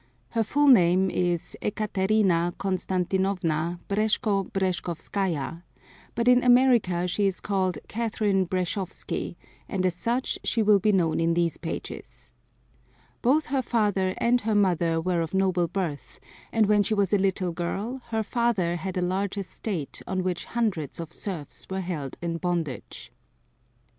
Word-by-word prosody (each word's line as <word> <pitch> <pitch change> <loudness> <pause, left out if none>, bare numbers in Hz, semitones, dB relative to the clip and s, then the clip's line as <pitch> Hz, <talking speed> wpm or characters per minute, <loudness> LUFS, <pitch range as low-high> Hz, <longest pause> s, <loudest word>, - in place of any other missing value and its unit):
Her 230 - 0
full 290 +7 +2
name 190 -7 +5
is 175 -2 -1
Ekaterina 195 -4 +1
Constantinovna 185 -3 -1
Breshko 205 -1 +1
Breshkovskaya, 175 -3 -2 0.5
but 235 +1 0
in 250 0 +6
America 245 -8 +4
she 200 +3 +1
is 190 - -2
called 190 -4 0
Catherine 210 -4 0
Breshkovsky, 185 +1 -3 0.3
and 190 -2 -1
as 180 - +2
such 235 +8 -1
she 225 - +1
will 210 -1 +5
be 210 +3 +3
known 170 -5 +2
in 165 0 +2
these 170 -2 +1
pages. 165 - -7 0.9
Both 285 +6 +3
her 270 -1 0
father 205 -6 +1
and 245 +1 +2
her 215 0 0
mother 175 -5 +2
were 175 0 0
of 165 +3 -3
noble 185 -2 +2
birth, 170 -5 -4 0.3
and 225 -1 +3
when 205 0 +4
she 215 +2 +1
was 200 -1 +1
a 205 - +4
little 190 -2 0
girl 200 +9 -3
her 220 -1 -1
father 210 -8 0
had 185 +2 -4
a 180 - +1
large 190 +3 -1
estate 185 -4 -4
on 185 -1 -1
which 180 -2 -2
hundreds 205 - -2
of 165 -1 -6
serfs 170 -8 -5
were 190 0 -2
held 160 -7 -5
in 165 -1 -1
bondage. 170 -6 -4
190 Hz, 145 wpm, -26 LUFS, 175-215 Hz, 0.9 s, in